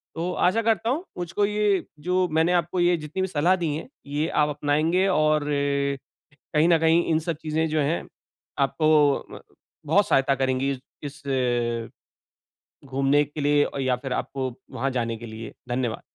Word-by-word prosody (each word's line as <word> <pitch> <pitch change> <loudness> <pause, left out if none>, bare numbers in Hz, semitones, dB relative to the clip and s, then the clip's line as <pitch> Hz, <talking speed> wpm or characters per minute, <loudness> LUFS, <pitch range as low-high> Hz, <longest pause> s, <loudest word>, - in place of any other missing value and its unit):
तो 170 +2 -2
आशा 185 +6 +2
करता 225 -1 +1
हूँ, 295 +8 0
मुझको 180 +4 0
ये 210 -2 +1
जो 180 +3 +1
मैंने 160 +2 +3
आपको 175 +1 0
ये 175 0 +4
जितनी 155 +4 -5
भी 190 - +1
सलाह 175 +1 +2
दी 165 - 0
हैं, 160 - -6 0.2
ये 145 +2 -1
आप 150 0 +2
अपनाएँगे 155 +6 +1
और 155 -4 +2
अ, 140 -1 0 0.6
कहीं 155 +1 +4
न 170 - +6
कहीं 165 +1 +4
इन 160 -1 +2
सब 165 +1 -3
चीज़ें 160 +1 0
जो 155 0 0
हैं 150 +4 -1 0.5
आपको 150 0 +3
म - - -9 0.5
बहुत 195 +7 +3
सहायता 135 0 +3
करेंगी, 130 +1 0 0.3
इस 145 0 -7
अ, 120 -3 0 1.0
घूमने 135 +2 +2
के 150 +2 -8
लिए 145 0 +3 0.2
या 130 -1 +1
फिर 130 +1 -6
आपको 130 0 -3 0.2
वहाँ 130 +1 -1
जाने 115 -3 -2
के 120 - -9
लिए 110 0 -8
धन्यवाद। 120 -2 -2
150 Hz, 170 wpm, -25 LUFS, 135-170 Hz, 1.0 s, न